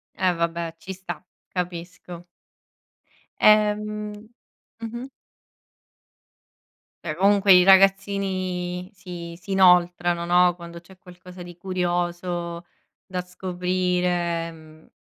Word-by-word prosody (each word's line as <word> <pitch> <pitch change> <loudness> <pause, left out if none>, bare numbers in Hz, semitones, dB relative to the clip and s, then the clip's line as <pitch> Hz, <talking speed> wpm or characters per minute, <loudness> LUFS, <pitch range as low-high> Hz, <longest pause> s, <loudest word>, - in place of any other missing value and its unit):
Eh 185 -1 +1
vabbè, 170 0 -2
ci 190 +3 -8
sta, 185 0 -8 0.2
capisco. 175 0 -6 1.2
Ehm 210 0 +3 0.7
mh-mh. 235 +3 -6 2.0
Beh 155 -2 -3
comunque, 200 +1 +4
i 180 0 +8
ragazzini 190 -2 +2
si 170 -3 -9
si 195 +2 -10
inoltrano, 175 -2 +4
no, 175 0 +4
quando 170 -1 -10
c'è 185 +2 -18
qualcosa 180 0 -13
di 175 -1 -12
curioso 175 -1 -3 0.4
da 185 -1 -4
scoprire, 180 -2 -1
mhmm, 155 0 -17
180 Hz, 90 wpm, -24 LUFS, 175-190 Hz, 2.0 s, i